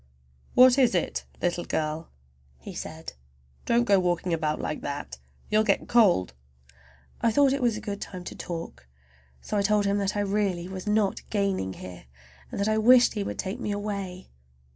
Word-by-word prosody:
"What 255 +1 +7
is 245 -7 +4
it, 175 - -1 0.2
little 175 0 0
girl?" 155 +1 -3 0.5
he 60 - -10
said. - - -7 0.5
"Don't 235 +1 +3
go 200 -4 +4
walking 175 -1 0
about 155 -2 -1
like 155 - -3
that—you'll 140 - -3
get 200 -3 +1
cold." 185 - +4 0.9
I 230 - +3
thought 275 +2 +4
it 280 - -2
was 235 -3 +1
a - - -7
good 205 -2 -5
time 185 -2 -7
to - - -8
talk, 165 - -7 0.5
so 210 - -3
I - - +3
told 205 0 +2
him 200 +1 +1
that 200 +1 -1
I - - +1
really 195 -3 -1
was 190 +1 -7
not 210 -2 +1
gaining 195 - -1
here, 90 -7 -10 0.4
and - - -6
that 200 - +1
I 215 0 +2
wished 245 +2 +6
he 210 - -2
would - - -5
take 195 +6 -4
me 210 - -3
away. 200 -3 -5
200 Hz, 180 wpm, -27 LUFS, 175-215 Hz, 0.9 s, What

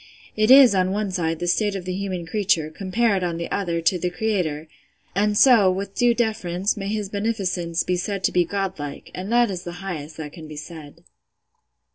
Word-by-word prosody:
It 215 0 +2
is, 265 -3 +9
on 185 -1 +2
one 205 0 -2
side, 165 -3 -1
the 175 - -4
state 200 +4 +1
of 185 -2 -5
the 185 - -3
human 185 -2 -4
creature, 170 -4 0
compared, 195 +3 0
on 170 -2 -2
the 170 - -5
other, 170 -4 -1
to 175 +2 +2
the 180 - -1
Creator; 180 -6 -2 0.5
and 205 +2 +1
so, 230 -7 +6
with 195 +1 -4
due 240 +2 +3
deference, 205 -5 -1
may 195 -2 -5
his 210 -1 -2
beneficence 190 -5 -1
be 180 - -1
said 195 +1 -3
to - - +2
be 180 - +3
Godlike, 185 -6 -5
and 190 +4 -6
that 240 -2 +3
is 180 -2 -5
the 175 - -6
highest 155 -4 -6
that 150 -2 -7
can 160 -3 -10
be 155 - -9
said. 155 +1 -10
185 Hz, 200 wpm, -23 LUFS, 170-205 Hz, 0.5 s, is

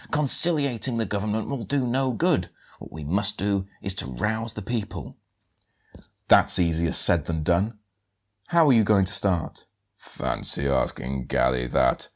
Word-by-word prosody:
Conciliating 140 -5 +3
the 115 - -2
government 105 +2 -4
will 140 -3 -6
do 135 +2 -2
no 130 +2 -1
good. 115 - -1 0.3
What - - -13
we 80 -1 -10
must 100 +7 +1
do 100 -1 -3 0.2
is 95 - +3
to - - -8
rouse 110 - -4
the 105 - -9
people." 100 - -7 1.1
"That's - - +5
easier 85 -2 -1
said 85 -4 +6
than 80 -2 -4
done; 95 +7 -1 0.7
how 170 -2 +2
are 135 - +4
you 115 -2 +3
going 100 -2 +1
to - - -1
start?" 90 -5 -2 0.3
"Fancy 70 - -3
asking 65 -1 -3
Galli 60 0 -1
that! - - -1
100 Hz, 155 wpm, -23 LUFS, 85-115 Hz, 1.1 s, said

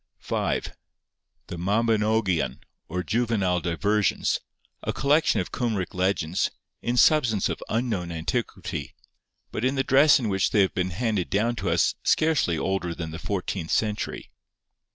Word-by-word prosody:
5. - - -2 0.7
The 90 - -7
Mabinogion, 105 -1 +1 0.3
or 90 +2 -3
Juvenile 110 -6 +1
Diversions, 100 +5 +1 0.4
a - - -2
collection 145 +3 +2
of - - -3
Cumric 110 -7 -2
legends, 90 -2 0 0.3
in 120 +1 -1
substance 120 -8 +4
of - - -4
unknown 110 -7 -1
antiquity, 80 0 -3 0.6
but 110 - -4
in 130 +2 +1
the 135 - +1
dress 140 +3 +6
in 120 - -2
which 95 -2 +1
they 105 - +3
have 95 - +2
been 90 0 -1
handed 105 -1 -1
down 110 +5 +1
to 95 - -2
us 85 0 +3
scarcely 155 - +2
older 90 -1 -1
than 80 -2 -5
the 80 - -6
fourteenth 90 -5 -3
century. 105 -1 -1
100 Hz, 140 wpm, -25 LUFS, 90-115 Hz, 0.7 s, dress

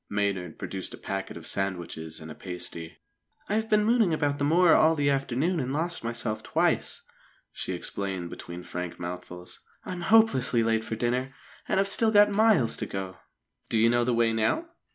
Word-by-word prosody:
Maynard 100 -5 -2
produced 95 -2 -6
a - - -18
packet 95 0 -5
of - - -11
sandwiches 85 -4 -4
and 80 0 -9
a - - -6
pasty. 90 -3 -7 0.5
"I've 220 +2 -1
been 210 -1 +3
mooning 220 -7 +3
about 145 -2 -1
the - - 0
moor 165 +4 +5
all 160 +1 +5
the 145 -2 +2
afternoon 140 +6 0
and 130 -2 -2
lost 165 +2 -2
myself 115 -1 -2
twice," - - 0 0.5
she - - -4
explained 95 -3 -4
between 85 +1 -8
frank 90 -1 -6
mouthfuls. 90 0 -7 0.3
"I'm 180 -1 -5
hopelessly 135 - +4
late 115 0 +1
for 115 - -4
dinner, 125 +4 -1 0.3
and - - +1
I've 195 - +2
still 220 +3 +4
got 205 -1 +6
miles 205 - +4
to - - -4
go." 95 -1 -5 0.5
"Do 115 - +1
you 115 +1 +4
know 120 0 +3
the 120 0 +1
way 115 -1 +2
now?" 115 - 0
120 Hz, 180 wpm, -27 LUFS, -, 0.5 s, got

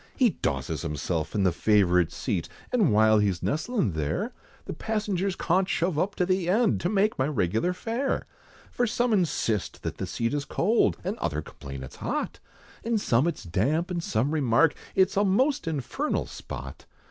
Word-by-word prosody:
He 245 -5 +4
dosses 65 - -2
himself 80 +3 -3
in 100 - +2
the 95 - +4
favourite 90 -3 +3
seat, - - -2 0.2
And 215 - +4
while 110 0 +5
he's 100 -4 0
nestlin' 165 - 0
there, 75 -2 -2 0.3
The - - -5
passengers 200 -4 -1
cawnt 185 +2 +1
shove 170 -4 0
up 200 +4 0
to 180 - +1
the 185 -1 0
end, 220 +4 +3
To 175 - 0
make 210 -2 +1
my 130 - +2
regular 115 - +1
fare. 235 +8 -2 0.5
For 245 - +1
some 240 +1 +1
insist 145 - 0
that - - -4
the - - -3
seat 115 +3 -1
is 145 -1 -1
cold! 215 +10 +2
And 195 +6 -3
others 75 -1 -2
complain 70 -1 -8
it's 65 - -10
hot! - - -3 0.4
And 230 -1 +1
some 130 - +2
it's 170 - -3
damp, 140 - 0
and 175 -1 -1
some 120 +3 0
remark, 145 0 +3 0.2
It's 190 0 +3
a 200 - +4
most 250 - +2
infernal 160 - -1
spot! - - -8
165 Hz, 175 wpm, -27 LUFS, -, 0.5 s, while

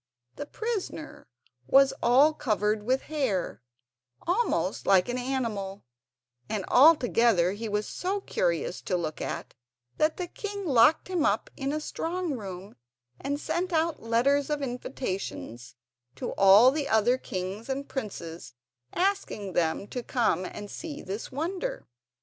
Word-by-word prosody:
The 290 - -6
prisoner 365 -10 -5 0.4
was 275 - +6
all 270 +6 +5
covered 210 - 0
with 255 +5 0
hair, 260 - -2 0.6
almost 395 +8 0
like 190 -2 +5
an 245 +1 -1
animal; 225 -7 -3 0.7
and 205 -3 -2
altogether 240 - +5
he 215 +3 -5
was 210 0 -1
so 385 +3 -2
curious - - -1
to 180 - -1
look 155 -3 -4
at - - -5 0.4
that 310 +1 +2
the 360 - -2
king 405 +2 -6
locked 265 0 +4
him 360 -4 0
up - - +1
in 275 -1 -2
a 305 - -1
strong 340 +2 -3
room 195 -3 -8 0.4
and 285 +1 -2
sent 360 +4 -2
out 325 -1 0
letters 265 +6 +2
of 295 -1 -1
invitation 240 - -4 0.6
to - - -4
all 200 +6 +7
the 295 0 -2
other 235 +4 +3
kings 195 +2 -5
and 275 +1 -3
princes 170 - -6 0.4
asking 360 - -1
them 165 +3 0
to 250 - -4
come 225 -7 0
and 205 +2 -7
see 310 -3 -7
this 200 +4 -5
wonder. 365 - -3
255 Hz, 140 wpm, -28 LUFS, 205-315 Hz, 0.7 s, all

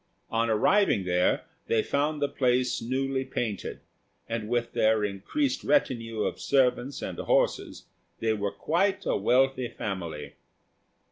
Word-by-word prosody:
On 115 0 +1
arriving 110 - +3
there, 90 0 +2 0.2
they 110 -1 +2
found 145 +1 0
the - - +3
place 125 -2 +1
newly 130 +2 -1
painted, 115 -6 -4 0.5
and 115 -2 -3
with 120 -1 -1
their 110 -1 +3
increased 105 - -2
retinue 115 - +1
of - - -2
servants 130 0 +1
and - - -5
horses, - - 0 0.3
they 110 -1 +1
were 100 -2 -2
quite 175 - 0
a - - +1
wealthy 130 +4 +2
family. 85 -9 -5
120 Hz, 130 wpm, -27 LUFS, 105-135 Hz, 0.5 s, arriving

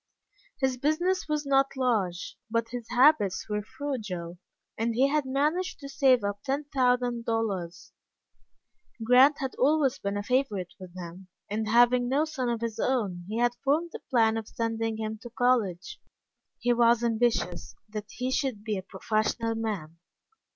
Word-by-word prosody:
His 265 -2 0
business 320 +8 0
was 300 -1 -1
not 275 0 +2
large, 210 -9 -1
but 230 0 -1
his 240 -1 -7
habits 250 -5 +3
were 210 -1 -1
frugal, 205 -9 -5 0.4
and 230 +1 -1
he 265 +3 +4
had 300 -1 +1
managed 305 +8 0
to 280 - -7
save 265 -4 +3
up 200 0 -3
ten 280 +2 -2
thousand 245 -2 +1
dollars. 200 -7 -3 1.1
Grant 255 +5 +6
had 265 -1 -3
always 280 -1 +3
been 200 0 -2
a 205 - -3
favorite 215 -7 -1
with 185 -1 -11
him, 180 +1 -9 0.2
and 215 +1 -1
having 245 +2 +4
no 285 +4 +2
son 275 -6 -3
of 235 -1 -2
his 230 -2 -3
own 200 -9 -1
he 215 +2 -3
had 240 0 +2
formed 310 +5 +1
the - - -7
plan 225 -3 +3
of 220 -1 -5
sending 225 -1 -2
him 220 0 -4
to 240 - -9
college. 240 - 0 0.6
He 245 0 +1
was 235 0 +4
ambitious 230 -6 0
that 210 -1 -7
he 250 +4 -3
should 260 -7 -1
be 215 -3 -2
a - - -6
professional 215 +4 -1
man. 205 -8 -4
235 Hz, 160 wpm, -28 LUFS, 210-265 Hz, 1.1 s, Grant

